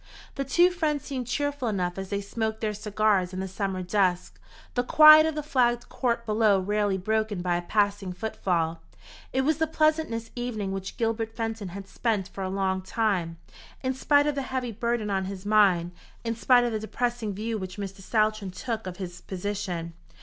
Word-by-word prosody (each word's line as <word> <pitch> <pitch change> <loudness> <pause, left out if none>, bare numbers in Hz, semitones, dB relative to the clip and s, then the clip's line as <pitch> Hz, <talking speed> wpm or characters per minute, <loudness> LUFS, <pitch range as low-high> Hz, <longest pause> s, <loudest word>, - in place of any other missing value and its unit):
The 275 - -2
two 345 +7 +4
friends 310 -5 -1
seemed 255 -4 -4
cheerful 285 0 -1
enough 180 -4 -1
as 195 -1 -6
they 200 0 -1
smoked 220 +2 -3
their 215 -1 -1
cigars 205 -3 +1
in 185 - -4
the 190 - -3
summer 190 -1 -3
dusk, 180 -1 0 0.3
the 245 - +1
quiet 310 +3 +8
of 320 - -2
the 300 - -3
flagged 240 -4 +1
court 235 -2 -1
below 215 -2 +3
rarely 205 0 0
broken 215 -1 -1
by 175 -1 +1
a 175 - -1
passing 205 0 0
footfall. 175 -5 -2 0.5
It 265 - +1
was 305 +3 +1
the 320 - +2
pleasantest 310 -7 0
evening 230 -5 -3
which 195 0 -5
Gilbert 225 -1 -1
Fenton 225 -3 -3
had 195 +2 -8
spent 210 -5 -1
for 195 - -6
a 185 - -2
long 190 -1 0
time, 185 -5 -1 0.5
in 260 0 0
spite 285 +2 +3
of 295 - +1
the 280 - -2
heavy 255 -2 -3
burden 230 -1 -1
on 190 -1 0
his 190 0 -7
mind, 195 -5 +4 0.3
in 230 0 -2
spite 245 +1 +4
of 240 - 0
the 220 - -1
depressing 225 -1 -2
view 220 +2 -3
which 185 0 -7
Mr. 195 -1 -6
Saltram 215 -1 0
took 220 +3 -4
of 180 -1 -6
his 180 -2 -7
position. 185 -3 -4
215 Hz, 190 wpm, -27 LUFS, 190-240 Hz, 0.5 s, quiet